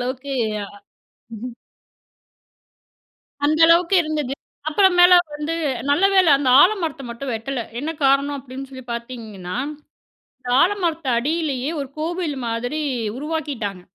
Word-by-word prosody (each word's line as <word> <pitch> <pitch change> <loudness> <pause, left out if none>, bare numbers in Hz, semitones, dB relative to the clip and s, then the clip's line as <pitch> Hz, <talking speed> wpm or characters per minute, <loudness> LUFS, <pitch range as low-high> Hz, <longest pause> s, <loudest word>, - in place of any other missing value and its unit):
அளவுக்கு 260 +2 -4 0.3
அ - - -8 0.7
ம்ஹ்ம். 240 +2 -7 1.9
அந்த 310 +2 +1
அளவுக்கு 340 +3 +4
இருந்தது. 300 -4 -2 0.4
அப்பறம் 375 +3 +3
மேல 355 +1 +8 0.2
வந்து 300 +2 -3 0.4
நல்லவேள 375 +4 +4
அந்த 275 -2 0
ஆலமரத்தை 335 -8 +1
மட்டும் 250 +2 -5
வெட்டல. 235 +3 -3 0.2
என்ன 295 +4 -3 0.2
காரணம் 275 +1 +2
அப்டினு 265 0 -9
சொல்லி 260 -2 -10
பார்த்தீங்கன்னா, 225 -6 -7 0.8
இந்த 250 - -8
ஆலமரத்து 335 -7 0
அடியில்லையே 285 -1 -1
ஒரு 275 - -5
கோவில் 330 -2 -2
மாதிரி 245 +7 -2 0.4
உருவாக்கிட்டாங்க. 275 - -4
280 Hz, 110 wpm, -21 LUFS, 250-325 Hz, 1.9 s, மேல